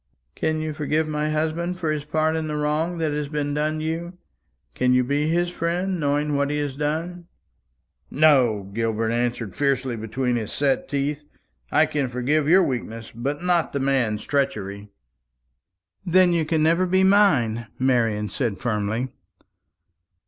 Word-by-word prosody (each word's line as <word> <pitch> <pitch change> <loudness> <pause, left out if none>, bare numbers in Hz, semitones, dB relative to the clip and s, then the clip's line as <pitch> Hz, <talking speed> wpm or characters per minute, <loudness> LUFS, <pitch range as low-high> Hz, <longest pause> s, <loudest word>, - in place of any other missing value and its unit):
"Can 155 0 -1
you 155 -1 -3
forgive 155 +1 0
my 150 0 -1
husband 160 +3 -1
for 160 -4 -1
his 150 -1 -3
part 155 +1 +1
in 160 -1 -2
the 150 - -3
wrong 150 +4 -1
that 160 -2 0
has 145 -1 -3
been 145 -1 -2
done 155 +1 -1
you? 170 +3 -4 0.6
Can 125 - +2
you 125 - +4
be 145 +4 0
his 175 +1 +1
friend, 180 +2 -1
knowing 145 0 0
what 140 0 +1
he 150 - -1
has 145 -2 -2
done?" 165 +4 -3 0.8
"No!" 130 -9 +3
Gilbert 115 0 -1
answered 120 -4 -1
fiercely 135 -3 0
between 120 +3 -1
his 110 -3 -4
set 140 -2 0
teeth. 145 +1 -2 0.5
"I - - +5
can 140 -4 -2
forgive 140 +5 0
your 185 +3 +6
weakness, 115 -5 -4
but 140 +8 -3
not 175 -2 +1
the 140 - -1
man's 130 -6 0
treachery." 105 -8 -2 1.1
"Then 180 0 +4
you 165 -2 +1
can 155 0 +1
never 170 +3 +3
be 190 +1 +3
mine," 140 - +3
Marian 115 -5 +1
said 120 -8 -2
firmly. 110 +3 -1
145 Hz, 155 wpm, -23 LUFS, 125-160 Hz, 1.1 s, your